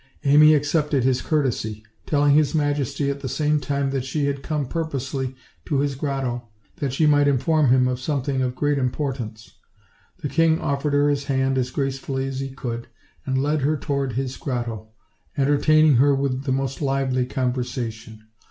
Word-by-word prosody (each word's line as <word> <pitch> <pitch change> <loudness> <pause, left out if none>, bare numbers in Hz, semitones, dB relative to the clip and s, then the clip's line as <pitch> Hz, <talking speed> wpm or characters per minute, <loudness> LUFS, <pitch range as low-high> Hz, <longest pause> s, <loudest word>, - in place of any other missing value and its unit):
Amy 150 +2 +7
accepted 145 -2 +1
his 130 0 +2
courtesy, 115 -8 -1 0.2
telling 145 -1 +3
his 150 +1 +3
majesty 145 -1 0
at 140 - -5
the 130 - -5
same 150 +3 +1
time 140 -1 -1
that 135 -2 -1
she 140 +2 -1
had 140 -1 -2
come 150 -2 -2
purposely 135 -4 -3 0.3
to 145 - -1
his 140 0 0
grotto 130 -4 -3 0.3
that 140 -3 -2
she 145 +4 +1
might 145 -1 +4
inform 145 +1 +2
him 125 0 +4
of 125 -1 -2
something 135 -1 -1
of 125 -1 -1
great 145 +1 +1
importance. 125 -4 -4 0.6
The - - 0
king 165 +2 +3
offered 140 -2 -1
her 145 0 +3
his 140 -1 0
hand 135 -1 +1
as 125 0 -1
gracefully 135 0 -2
as 135 -1 -4
he 135 0 -3
could, 120 -3 -5 0.4
and 130 0 +1
led 150 +1 0
her 150 +3 +1
toward 140 -3 -2
his 130 +1 -3
grotto, 115 -5 -4 0.5
entertaining 145 +1 +4
her 140 +2 +4
with 135 -1 -2
the 135 - 0
most 135 +1 -2
lively 135 -2 0
conversation. 125 -4 -3
135 Hz, 170 wpm, -23 LUFS, 130-145 Hz, 0.6 s, Amy